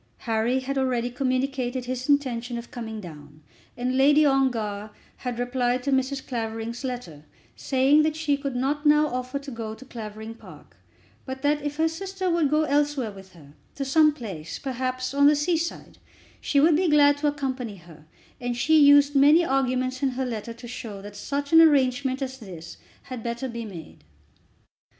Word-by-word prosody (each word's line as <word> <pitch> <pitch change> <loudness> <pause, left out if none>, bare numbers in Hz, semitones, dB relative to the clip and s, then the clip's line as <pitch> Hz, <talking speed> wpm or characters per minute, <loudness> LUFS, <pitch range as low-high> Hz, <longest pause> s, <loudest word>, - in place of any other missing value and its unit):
Harry 230 +3 +1
had 270 +1 -2
already 245 -2 0
communicated 255 0 -1
his 255 +2 -4
intention 245 -4 0
of 235 0 -9
coming 225 -5 -6
down; 150 -4 -12 0.3
and 250 +1 -1
Lady 290 +3 +5
Ongar 225 -7 0 0.3
had 250 -2 -5
replied 245 0 0
to 280 - -1
Mrs. 265 0 0
Clavering's 225 0 -4
letter, 240 - -6 0.3
saying 270 +3 +3
that 310 0 0
she 310 -2 +1
could 275 -2 -4
not 280 +4 -1
now 300 0 +5
offer 255 -1 -3
to 280 0 -8
go 225 -2 -5
to 265 - -14
Clavering 220 -2 -8
Park, 225 - -15 0.5
but 265 0 -7
that 295 +1 +2
if 290 0 -4
her 320 +1 +2
sister 375 +2 -3
would 335 -4 +2
go 305 +2 +2
elsewhere 290 -5 0
with 195 -1 -14
her, 145 -4 -16 0.2
to 275 - -3
some 305 +3 +5
place, 190 - -7
perhaps, 255 0 -3
on 285 0 +5
the 300 - +5
sea 315 +4 +1
side, 330 +1 -5 0.4
she 280 - +1
would 315 +2 +5
be 355 +2 +2
glad 290 -1 +5
to 300 - +1
accompany 260 -6 -3
her; 165 -4 -16 0.3
and 245 -1 -3
she 315 +5 +4
used 285 0 +6
many 295 +5 +6
arguments 255 -2 0
in 275 - +2
her 260 +1 -2
letter 230 -2 -5
to 235 +1 -10
show 230 -4 -7
that 205 0 -10
such 285 +5 -4
an 325 - +9
arrangement 270 -3 +3
as 265 0 -6
this 170 -6 -10 0.3
had 255 -3 -7
better 235 +3 -3
be 235 -2 -6
made. 170 - -11
260 Hz, 180 wpm, -25 LUFS, 235-285 Hz, 0.5 s, an